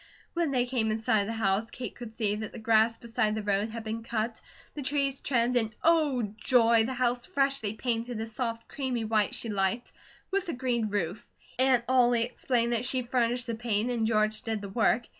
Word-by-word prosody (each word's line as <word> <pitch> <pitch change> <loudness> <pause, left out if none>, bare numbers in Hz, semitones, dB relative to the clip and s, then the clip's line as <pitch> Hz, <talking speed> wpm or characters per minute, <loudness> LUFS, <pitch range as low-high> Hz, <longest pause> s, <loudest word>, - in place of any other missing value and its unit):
When 340 -3 0
they 250 -3 +1
came 245 -3 0
in 215 - 0
sight 220 -1 +2
of 200 - -3
the 225 - -2
house, 215 0 0
Kate 245 -4 -6
could 235 -2 -9
see 215 -3 +1
that 215 -1 -5
the - - -9
grass 225 0 +3
beside 220 -2 -1
the 215 - -3
road 205 +1 +1
had 225 0 -6
been 220 +1 -4
cut, 225 0 -3 0.3
the 295 - -5
trees 275 0 0
trimmed, 245 -2 +1
and 220 -3 +1
Oh, 305 -7 +3 0.2
joy, 230 -3 +4
the 260 +2 -3
house 245 -1 0
freshly 275 - 0
painted 235 0 -2
a 225 - -2
soft, 230 0 -4
creamy 255 -5 -2
white 215 -1 +1
she 230 - -6
liked, 200 +3 0 0.4
with 390 -2 -1
a - - -1
green 245 -3 0
roof. 200 -2 -3 0.3
Aunt 260 -2 +4
Ollie 245 -2 +4
explained 240 0 0
that 235 0 0
she 255 0 0
furnished 245 0 +1
the 235 - -3
paint 225 0 -1
and 225 -2 0
George 215 -1 +1
did 220 -2 -3
the 200 - -6
work. 225 +3 +2
230 Hz, 210 wpm, -29 LUFS, 220-250 Hz, 0.4 s, joy